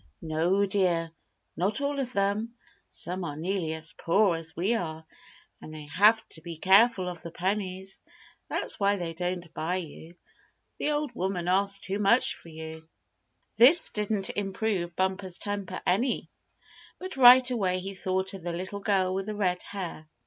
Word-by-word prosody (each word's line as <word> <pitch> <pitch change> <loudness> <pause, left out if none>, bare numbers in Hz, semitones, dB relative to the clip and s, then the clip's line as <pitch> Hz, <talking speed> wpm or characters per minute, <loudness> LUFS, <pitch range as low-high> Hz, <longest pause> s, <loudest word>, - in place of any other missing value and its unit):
"No, 170 +5 +1
dear, 180 -4 +1 0.4
not 200 +6 0
all 280 0 -1
of 255 -2 -2
them. 205 +3 -1 0.3
Some 180 +1 -2
are 150 -4 -4
nearly 170 0 -2
as 160 0 -5
poor 190 +1 +2
as 165 0 -6
we 190 +7 +1
are, 160 -6 -4 0.6
and - - -10
they 155 -1 -8
have 220 +3 +5
to 160 - -8
be 165 0 -7
careful 195 +2 +5
of 175 -2 -6
the 170 - -7
pennies. 190 +1 -3 0.5
That's - - 0
why 200 0 +3
they 175 -4 -4
don't 175 0 -4
buy 170 +3 -2
you. 170 -1 -7 0.6
The - - 0
old 295 -2 -1
woman 185 -4 -2
asks 195 +2 +2
too 200 +1 -2
much 210 +5 +4
for 170 - -14
you." 160 0 -9 0.7
This 275 +9 +6
didn't 210 -2 -2
improve 195 -3 -2
Bumper's 190 -1 -2
temper 200 -3 -4
any; 230 +8 0 0.7
but 370 +1 -7
right 255 0 +8
away 190 -6 0
he 190 +2 -5
thought 190 0 -2
of 195 - -8
the 170 0 -4
little 190 +4 -4
girl 190 -3 +1
with 195 +1 -3
the 215 - -4
red 180 -3 0
hair. 175 -6 -7
190 Hz, 165 wpm, -28 LUFS, 170-205 Hz, 0.7 s, right